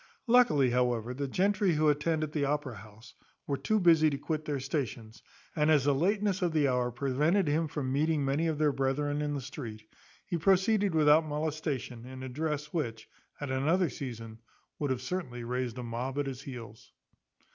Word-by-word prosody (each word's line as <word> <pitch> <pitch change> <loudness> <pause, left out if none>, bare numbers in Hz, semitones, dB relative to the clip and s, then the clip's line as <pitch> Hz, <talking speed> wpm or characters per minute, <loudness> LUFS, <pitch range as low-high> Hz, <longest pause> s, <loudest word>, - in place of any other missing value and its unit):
Luckily, 230 - +4
however, 125 -1 0
the 140 +2 -3
gentry 195 +4 +2
who 155 0 +2
attend 155 +2 +1
at 155 - -3
the 150 -2 -1
Opera 140 -4 -1
house 110 +3 -14 0.3
were 140 - -1
too 215 +11 0
busy 165 -4 +5
to 140 - -3
quit 155 +1 -3
their 145 -2 -2
stations, 125 -5 -4 0.3
and 150 0 +2
as 150 -4 +5
the 145 0 +3
lateness 200 +5 +1
of 175 -3 +1
the 150 -3 +3
hour 125 -1 +1
prevented 145 - +1
him 155 +2 +1
from 135 -3 -3
meeting 150 0 +1
many 145 +5 +1
of 160 -2 -1
their 150 -1 +3
brethren 145 +2 -1
in 145 -1 -1
the 140 - -3
street, 120 -5 -7 0.4
he 175 - -2
proceeded 195 +2 +3
without 155 +1 +5
molestation, 150 -5 -3
in 130 0 -8
a 130 - -5
dress, 150 +2 -3
which, 115 -9 -3 0.3
at 145 -2 -4
another 160 +7 +2
season, 115 -4 -7 0.4
would 145 - -1
have 130 -1 -2
certainly 130 -7 -4
raised 125 0 -3
a 125 - -4
mob 120 +3 -4
at 145 - 0
his 135 -2 -5
heels. 115 -5 -10
145 Hz, 190 wpm, -30 LUFS, 125-155 Hz, 0.4 s, busy